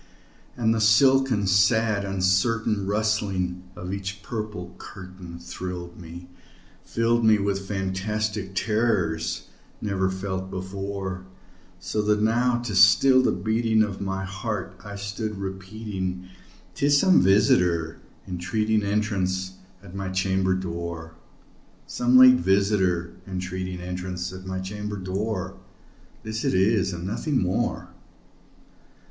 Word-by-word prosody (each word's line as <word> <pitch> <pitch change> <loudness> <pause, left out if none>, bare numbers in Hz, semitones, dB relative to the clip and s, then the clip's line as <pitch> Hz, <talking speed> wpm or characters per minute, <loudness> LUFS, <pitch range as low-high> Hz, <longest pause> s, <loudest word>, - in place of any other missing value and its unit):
And 115 -2 +2
the 115 - 0
silken 130 0 +4
sad 100 +2 +3
uncertain 100 +2 +1
rustling 100 -4 0
of 90 +2 -6
each 100 0 -5
purple 105 -6 -5
curtain 90 -3 -10
Thrilled 90 0 -7
me 85 +1 -10 0.6
filled 115 0 +1
me 110 -1 +6
with 100 -1 -2
fantastic 100 +1 -2
terrors 95 -7 0 0.3
never 95 -2 0
felt 95 0 -4
before; 95 0 -5 0.5
So 105 +4 -2
that 105 0 +2
now, 120 +3 +2
to 115 -3 -4
still 95 +8 +6
the - - +2
beating 110 +4 +2
of 100 -2 -4
my 95 0 -2
heart, 95 +1 -4
I 105 0 -8
stood 100 +1 -4
repeating 95 -1 -5 0.5
"'Tis 145 +8 +3
some 185 +2 +5
visitor 90 -4 +3 0.3
entreating 105 +5 0
entrance 100 -3 -1 0.3
at 95 -3 -12
my 95 -1 -4
chamber 95 0 +1
door 85 -3 -5 0.7
Some 125 +1 +3
late 130 0 +9
visitor 95 -2 +1
entreating 90 -1 -4
entrance 90 0 -4
at 95 0 -9
my 95 0 -3
chamber 105 +2 -5
door; 95 0 -3 0.7
This 110 0 -4
it - - +1
is 95 +1 +3
and 85 0 -6
nothing 130 +8 -1
more." 90 0 -1
95 Hz, 120 wpm, -25 LUFS, 95-110 Hz, 0.7 s, late